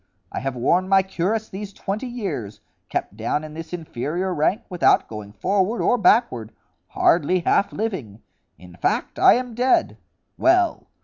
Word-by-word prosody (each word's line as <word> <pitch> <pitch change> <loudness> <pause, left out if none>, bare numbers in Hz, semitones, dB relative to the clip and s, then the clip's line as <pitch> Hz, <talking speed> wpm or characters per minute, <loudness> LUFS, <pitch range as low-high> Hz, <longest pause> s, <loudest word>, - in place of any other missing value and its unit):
I - - -3
have 135 +1 -3
worn 175 +10 +1
my 195 -1 +5
cuirass 195 +4 -2
these 200 +1 -7
twenty 210 +8 -4
years, 175 - -5 0.3
kept - - -3
down 115 +7 -2
in 155 -1 -8
this 165 +1 -8
inferior 170 +2 -3
rank, 180 +8 +1
without 180 -4 +3
going 105 -2 -8
forward 195 - 0
or - - +3
backward, 130 - +3 0.4
hardly 175 +2 +2
half 200 - +2
living. 135 - -4 0.3
In 90 -1 -14
fact, - - -1
I - - +7
am 250 -1 -3
dead. 250 +3 +1 0.4
Well! 345 +1 +2
185 Hz, 150 wpm, -22 LUFS, 135-215 Hz, 0.4 s, I